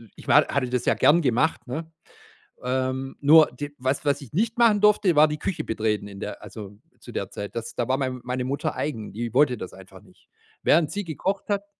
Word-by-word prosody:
ich - - -14
war - - +5
hatte 130 -3 -1
das 125 -1 -1
ja - - +3
gern 170 +4 +4
gemacht, 135 +3 0
ne? 160 +6 -5 0.7
Ähm, 130 +1 -2
nur 155 +2 +7
d 145 +4 -7
was 130 +3 -1
was 145 0 +1
ich 130 - -12
nicht 225 +7 0
machen 225 -3 +5
durfte, 210 -4 +4
war 150 +1 +7
die 150 0 -4
Küche 190 - -3
betreten 110 -2 -1
in 100 -1 -10
der 105 - -7
also 105 -2 -10 0.2
zu - - -12
der - - -4
Zeit. 100 - -7
Das 115 -1 -5
da 120 - -1
war 130 +1 +1
mein 130 -2 -3
meine 125 +1 -3
Mutter 140 +2 -2
eigen, 115 -8 -4
die 115 +1 -4
wollte 130 -2 +3
das 95 - -8
einfach - - -14
nicht. - - -24 0.3
Während 155 -2 +3
sie 205 0 -3
gekocht 190 +6 -3
hat 200 0 -1
135 Hz, 220 wpm, -24 LUFS, 120-160 Hz, 0.7 s, nur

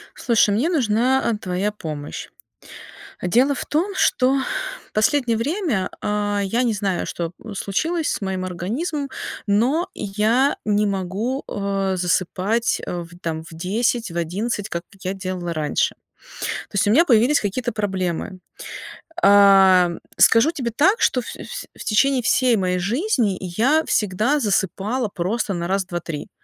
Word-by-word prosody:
Слушай, 225 -4 +3
мне 265 +10 +1
нужна, 255 -3 +2
а, 230 - +1
твоя 195 +1 -2
помощь. 155 -7 -6 0.9
Дело 250 +10 +3
в - - -5
том, 365 +6 -1
что 265 -4 +3 0.6
последнее 235 +2 +2
время, 275 - -1
а, 205 -1 -1
я 225 +5 0
не 235 -3 +1
знаю, 200 -4 -1
что 170 -1 -4 0.2
случилось 315 - -1
с - - -2
моим 190 -1 -2
организмом, 265 - -3 0.4
но 260 - +2
я 220 +7 +1
не 210 0 +2
могу, 200 +7 -2
а, 195 -1 -1
засыпать, 185 +5 0
а, 175 -1 -4
в 165 - -14
там 160 -1 -3
в 160 - -13
10, 220 +4 -1
в 170 - -5
11, 200 +5 -2
как 170 0 -4 0.2
я 185 +1 -2
делала 185 -3 -4
раньше. 155 -2 0 0.5
То - - -6
есть, 200 - +2
у 205 - +3
меня 315 +10 +6
появились 245 +4 +4
какие-то 225 +4 -2
проблемы. 185 -3 -2 0.8
Ам, 195 -3 +6 0.2
скажу 230 +7 +6
тебе 255 -8 -3
так, 385 - +4
что 250 - +2
всё - - -8
вс - - -7
в - - -6
течение 260 +4 +2
всей 250 +1 +3
моей 180 -2 0
жизни 230 - 0
я 230 - +1
всегда 215 +8 +1
засыпала 210 - 0
просто 200 +3 -2
на 170 -1 -3
раз-два-три. 175 -5 -3
210 Hz, 145 wpm, -22 LUFS, 185-250 Hz, 0.9 s, меня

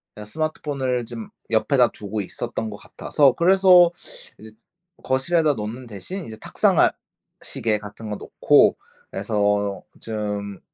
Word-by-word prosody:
그냥 105 - -9
스마트폰을 135 -2 -2
좀 115 -1 -8 0.2
옆에다 115 +2 +3
두고 105 +1 -6
있었던 110 +3 -5
것 105 - -8
같아서 140 +4 +1
그래서 180 -1 +6 0.5
이제 110 - -11 0.5
거실에다 150 +4 +2
놓는 115 +2 -6
대신 120 - -7
이제 110 - -8
탁상 - - +1
알 - - +5 0.5
시계 110 -2 -1
같은 105 +1 -9
거 105 - -3
놓고 - - +3 0.4
그래서 100 -1 0 0.2
좀 105 -3 -4
115 Hz, 275 characters per minute, -23 LUFS, 105-140 Hz, 0.5 s, 그래서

